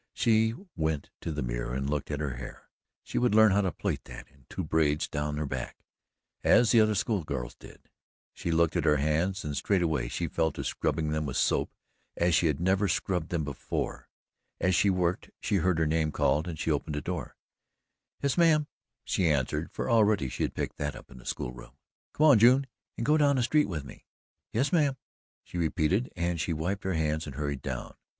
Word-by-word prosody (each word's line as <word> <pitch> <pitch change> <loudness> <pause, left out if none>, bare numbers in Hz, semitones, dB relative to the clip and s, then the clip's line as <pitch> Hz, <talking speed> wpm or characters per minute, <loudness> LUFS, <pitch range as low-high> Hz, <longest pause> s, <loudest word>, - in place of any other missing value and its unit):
She 110 0 +3 0.2
went 80 -3 -2
to 85 - -3
the 75 -2 -3
mirror - - -3
and 70 +1 -2
looked 75 -1 -2
at 75 -1 -2
her 70 -5 -3
hair - - -10 0.3
she - - -2
would 120 -3 +2
learn 110 -1 +7
how 100 +2 +3
to 95 -2 0
plait - - -3
that - - -10
in 70 -3 -26
two 95 - -4
braids 75 -1 +1
down 75 0 -3
her 75 - -1
back, 65 -2 -5 0.7
as 120 - +5
the 115 - +6
other 110 0 +3
school 95 -1 0
girls 65 -5 -4
did. - - -16 0.5
She - - -5
looked 85 -1 +2
at - - +1
her 75 -1 +4
hands 80 +7 0
and 75 -1 -3
straightway 85 -5 +1
she 85 - -2
fell 80 +1 0
to - - -5
scrubbing 80 -2 -1
them 75 -1 -1
with 65 - -3
soap - - +2 0.5
as 85 0 +2
she 80 +2 +4
had 75 -3 0
never 95 +3 +2
scrubbed 90 -4 -1
them 85 -3 -1
before. 70 -3 -4 0.5
As 90 - +2
she 100 +4 +4
worked, 90 0 0
she 105 - 0
heard 90 -1 +2
her 80 - +2
name 80 0 +1
called 75 +3 +1
and 85 -3 -5
she 80 - -1
opened 75 +1 -1
the 75 - -2
door. 85 -3 -5 0.9
"Yes, 140 +4 +1
mam!" 155 -3 +5 0.4
she 90 -3 +1
answered, 70 -4 0
for - - -4
already 105 - +3
she - - -6
had - - -1
picked - - -3
that 75 -2 -3
up - - -13
in 65 - -12
the - - -15
school - - -3
room. - - -13 0.4
"Come 155 - +4
on, 140 -8 +7
June, 130 +5 +6 0.3
and 115 - -2
go 150 +2 +4
down 145 -2 +4
the 125 - +1
street 150 +1 +2
with 75 -6 -3
me." 65 - -13 0.4
"Yes, 135 - 0
mam," 145 -5 +3 0.5
she 90 - -6
repeated, 85 +8 +1
and 85 -2 -1
she 85 - -1
wiped 90 +6 -3
her 95 - 0
hands 80 0 -1
and 70 - -7
hurried 70 -2 -3
down. - - -4
Mrs. - - -24
80 Hz, 215 wpm, -29 LUFS, 75-100 Hz, 0.9 s, learn